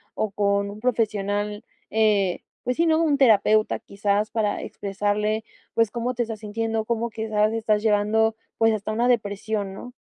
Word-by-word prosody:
o 215 -2 -1
con 200 0 +1
un 210 - -10
profesional? 210 -3 -1 0.3
Eh, 210 -4 +2 0.2
pues 250 0 -1
sí, 335 - +3
¿no?, 320 0 +3
un 295 -3 +2
terapeuta, 215 -4 +4
quizás 205 +1 -1
para 210 -2 0
expresarle, 210 +2 -1 0.3
pues, 230 -2 +3
cómo 240 +1 -2
te 240 - +1
estás 225 -2 -6
sintiendo, 225 +1 -2
cómo 235 0 -1
quizás 215 -1 0
estás 220 -2 +1
llevando, 220 +1 +2 0.2
pues, 225 -1 +4
hasta 215 0 -3
una 235 +3 +1
depresión, 205 -3 -1
¿no? 245 +5 -9
215 Hz, 160 wpm, -24 LUFS, 205-225 Hz, 0.3 s, terapeuta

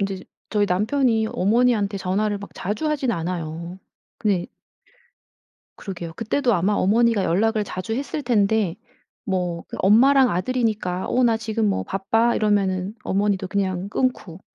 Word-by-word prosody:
이제 195 -1 -3 0.3
저희 205 -1 +2
남편이 220 +4 +1
어머니한테 210 0 +2
전화를 200 +2 -1
막 200 - -10
자주 210 - -2
하진 275 -5 0
않아요. 170 0 -4 0.4
근데 195 -5 0 1.3
그러게요. 170 -4 -6
그때도 240 +4 0
아마 190 +3 +1
어머니가 220 +1 +2
연락을 215 +5 +1
자주 185 +3 -4
했을 280 +4 -3
텐데 215 -6 +1 0.5
뭐 180 -4 -2
그 - - -7
엄마랑 255 +6 +5
아들이니까 210 -2 -1
"어 255 - +2
나 230 -2 +3
지금 220 0 -1
뭐 195 - -1
바빠." 225 +5 +1
이러면은 200 -2 0
어머니도 200 -1 0
그냥 190 -1 -1
끊고 205 -9 -2
205 Hz, 315 characters per minute, -23 LUFS, 185-230 Hz, 1.3 s, 엄마랑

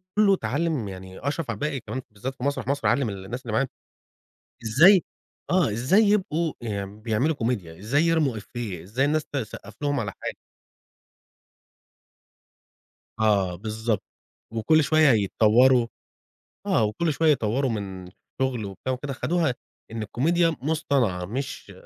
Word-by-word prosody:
كلّه 210 -2 +5
اتعلم 145 - -1
يعني 95 0 -9
أشرف 145 -3 -2
عبد 110 +3 -5
الباقي 150 -3 -1
كمان 130 +1 -5
بالذات 125 +6 -5
في 125 - -9
مسرح 140 -4 -1
مصر 140 +1 0
علم 135 -5 +2
الناس 100 +5 -6
اللي 115 -4 -6
معاه 135 +4 +2 1.0
إزاي 170 - +6 0.5
آه، 180 -9 +3
إزاي 130 - +3
يبقوا 185 -6 +1 0.3
بيعملوا 110 +9 -1
كوميديا، 105 - -3
زي 135 +9 +2
يرموا 160 -6 +2
إيفيه 105 -4 -6
إزاي 110 +10 -1
الناس 150 +1 +1
تسقف 110 -6 -6
لهم 145 -2 +1
على 100 -4 -3
حاجة. - - -4 2.8
آه، 100 -5 +2
بالضبط. 110 +2 -2 0.5
وكل 155 +8 +3
شويّة 155 0 +5
يتطوروا 115 +4 +4 0.8
آه، 110 - +3
وكل 130 +10 0
شويّة 160 +1 +4
يطوروا 130 +1 0
من 95 -4 -5
الشغل 125 +5 -4
وبتاع 100 +6 -4
وكده 135 +2 -4
خدوها 160 0 0 0.4
إن 110 -1 -4
الكوميديا 165 - +1
مصطنعة 140 - 0
مش 125 +8 -5
125 Hz, 130 wpm, -25 LUFS, 105-150 Hz, 2.8 s, إزاي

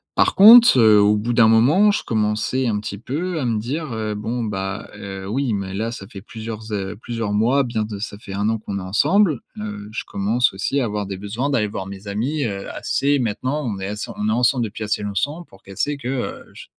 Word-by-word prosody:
Par - - +3
conte, 230 +4 +9
heu, 110 -3 +6
au 105 +1 +4
bout 115 +3 -2
d'un 115 -2 +5
moment, 145 - +5
je - - -2
commençais 110 +4 0
un 105 -2 0
petit 100 -1 -6
peu 160 - -3
à 130 - -2
me 115 -3 0
dire, 135 +3 -4
heu: 110 -1 -3
«Bon, 115 +3 -3
bah, 95 -1 -4
heu, 95 -1 -7
oui, 130 0 0
mais 95 -1 -3
là, 115 +3 -2
ça 100 -5 -8
fait 100 -4 -10
plusieurs 110 -1 -8
é 100 0 -3
plusieurs 115 -3 -4
mois, 125 +7 +3
bien 115 -3 -2
de 105 -2 -7
ça 100 -1 -5
fait 95 - -9
1 100 +2 0
an 115 - 0
qu'on 100 -2 -5
est - - -6
ensemble. 150 - +2 0.2
Heu, 105 -1 -6
je - - -3
commence 110 +6 +1
aussi 135 +8 -1
à - - 0
avoir 105 -2 -3
des 95 -1 -5
besoins 110 +8 -3
d'aller 110 -5 +1
voir 95 -2 -5
mes 100 +1 -9
amis, 130 +9 -2
heu, 100 -2 -4
assez 140 0 0
maintenant 130 +6 -2
on 105 -4 -3
est 95 - -4
ass 105 +1 -5
on 105 +1 -1
est - - +2
ensemble 120 +1 +2
depuis 110 +1 -6
assez 105 0 -1
longtemps 145 - -2
pour 95 - -19
qu'elle 95 -1 -12
sait 145 0 0
que, 125 - -7
heu, 130 -2 -4
je - - -11
110 Hz, 240 wpm, -21 LUFS, 105-130 Hz, 0.2 s, conte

